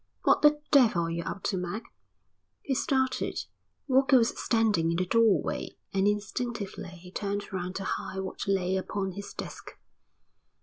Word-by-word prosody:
"What - - +4
the 295 0 +6
devil 235 - +5
are 165 - -2
you 170 0 -2
up 195 - -5
to, 190 - 0
Mac?" 180 +5 -4 0.8
He 275 - -1
started. 260 0 0 0.4
Walker 265 0 +5
was 230 -1 +4
standing 215 -8 +2
in 170 - 0
the 185 - +1
doorway 220 -3 +2 0.2
and 195 +1 +2
instinctively 210 -1 -2
he 180 +1 -13
turned 200 0 -3
round 185 0 -3
to 195 - -3
hide 190 - -3
what 190 +2 -5
lay 190 -1 +1
upon 190 0 -2
his 200 +2 -7
desk. - - -8
200 Hz, 160 wpm, -29 LUFS, 185-235 Hz, 0.8 s, the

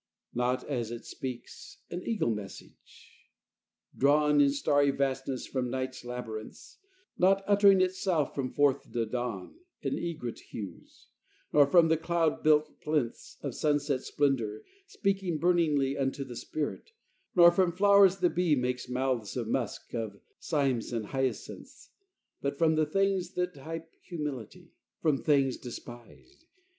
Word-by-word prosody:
Not 125 +1 0
as 120 -6 -2
it 120 0 -7
speaks 130 -2 -8
an 175 - -4
eagle 220 - 0
message 105 -3 -9 0.8
drawn 150 +1 +4
In 140 - +5
starry 145 0 +2
vastness 135 -1 -1
from 130 -2 -2
night's 130 +1 -4
labyrinths: 120 -3 -7 0.4
Not 195 +2 +4
uttering 200 -1 +5
itself 185 -5 0
from 130 -3 -3
forth 140 -1 +1
the 115 -1 0
dawn 115 - -4 0.2
In - - -1
egret 155 -9 -4
hues: 100 -6 -10 0.5
nor 145 -2 +6
from 165 +2 +6
the 160 - +3
cloud 165 -1 0
built 155 0 +2
plinths 150 -6 -2
Of - - -3
sunset's 145 -3 0
splendor, 120 -7 0 0.2
speaking 195 - -1
burningly 155 -6 +2
Unto 140 0 -1
the 125 -3 -9
spirit; 155 - -5 0.4
nor 175 -1 +8
from 180 0 +2
flow'rs 195 0 +5
the 175 - +3
bee 175 -3 +2
Makes 125 -1 -2
mouths 125 -4 -1
of - - -2
musk - - -3
of, 110 -4 -4 0.2
cymes 135 -8 0
of 115 -2 -2
hyacinths, 135 -1 -4 0.5
But 140 0 -2
from 160 0 +3
the 155 -1 +2
things 195 +1 0
that 180 0 -1
type 165 +3 -8
humility. 150 - -6 0.3
From 150 -4 +2
things 135 -4 +2
despised. 120 - -11
145 Hz, 135 wpm, -30 LUFS, 125-170 Hz, 0.8 s, nor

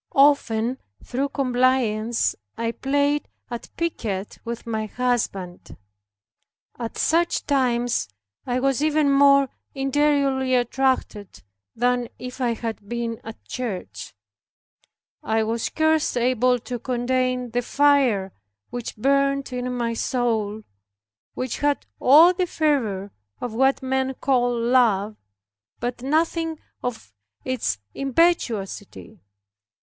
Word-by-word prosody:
Often 260 -4 +3 0.2
through 270 +3 -2
compliance 245 -4 +1 0.2
I 230 0 -1
played 285 +3 0 0.2
at 240 - -6
piquet 215 - -2 0.2
with 235 0 -6
my 220 -2 -2
husband. 215 -7 -2 1.0
At 230 -2 -5
such 340 +1 +1
times 245 - +1 0.4
I 250 0 0
was 270 0 +1
even 305 -2 +3
more 275 0 +6 0.3
interiorly 275 -1 +2
attracted 240 - -1 0.3
than 245 0 +1
if 250 +1 -8
I 240 -2 +1
had 220 -3 -6
been 235 -1 -3
at 225 0 -10
church. 220 - -6 1.1
I 220 0 +1
was 225 +1 -2
scarce 315 -3 +1
able 250 +1 +3
to 245 0 -5
contain 250 0 -1
the 245 +1 0
fire 255 -8 +2 0.4
which 240 -2 -5
burned 275 +2 +1
in 250 0 -2
my 235 -2 -1
soul, 220 -3 -1 0.7
which 255 -2 -3
had 290 0 0
all 315 +7 +7
the 365 0 -1
fervor 230 - 0 0.3
of 245 -3 -4
what 265 +3 +2
men 265 0 0
call 245 -3 +1
love, 230 -4 +2 0.6
but 245 0 -3
nothing 320 +3 0 0.2
of 225 - -5 0.3
its 250 - -1 0.2
impetuosity. 235 - -1
250 Hz, 110 wpm, -23 LUFS, 230-275 Hz, 1.1 s, all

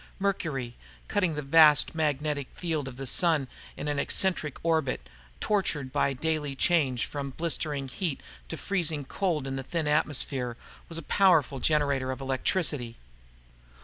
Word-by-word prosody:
Mercury, 155 -11 -2 0.3
cutting 185 -6 0
the 150 - -3
vast 150 +1 +6
magnetic 150 -3 -1
field 160 -6 -2
of 130 -2 -8
the 135 - -5
Sun 155 0 +3 0.3
in - - -5
an 145 -1 -1
eccentric 155 -2 +1
orbit, 155 - 0 0.3
tortured 160 -10 -1
by 140 0 +1
the 130 - -8
daily 155 -3 -1
change 135 -6 +2
from 140 -2 -5
blistering 150 -4 -1
heat 155 +2 -3 0.3
to - - -5
freezing 165 -7 -1
cold 160 -2 -1
in 135 0 -3
the 135 - -4
thin 160 +3 -2
atmosphere, 135 -5 0 0.3
was 165 - -2
a 165 - -4
powerful 160 -7 +3
generator 140 -2 +1
of 130 - -5
electricity. 135 -2 0
150 Hz, 145 wpm, -28 LUFS, 135-165 Hz, 0.3 s, vast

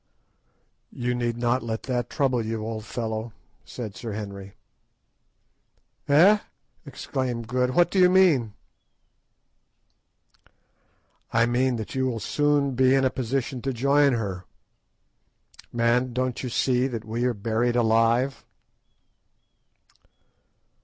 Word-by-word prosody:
"You 125 0 -2
need 120 -1 -2
not 120 +2 +1
let 115 -1 -4
that 125 -2 -2
trouble 130 -5 0
you, 110 0 -4
old 110 -1 -5
fellow," 110 -1 -4 0.3
said 110 -5 -7
Sir 115 -3 -6
Henry. 100 -2 -7 1.5
"Eh!" 180 +9 +6 0.5
exclaimed 125 -3 -4
Good; 125 +1 0
"what 175 0 +4
do 195 - +1
you 180 -1 +6
mean?" 160 - +3 2.8
"I 115 0 +3
mean 125 +2 +1
that 110 -2 -6
you 130 0 0
will 120 -3 -2
soon 145 +3 +1
be 130 +1 +4
in 135 -1 +2
a 130 - +2
position 130 +1 -3
to 135 - -2
join 140 +3 +3
her. 95 -6 -3 1.3
_Man, 120 +1 +1
don't 130 -1 -1
you 125 - -4
see 125 +1 +1
that 115 -4 -6
we 115 +3 -2
are 125 -2 0
buried 115 +3 0
alive? 115 +3 +2
120 Hz, 120 wpm, -25 LUFS, 115-130 Hz, 2.8 s, Eh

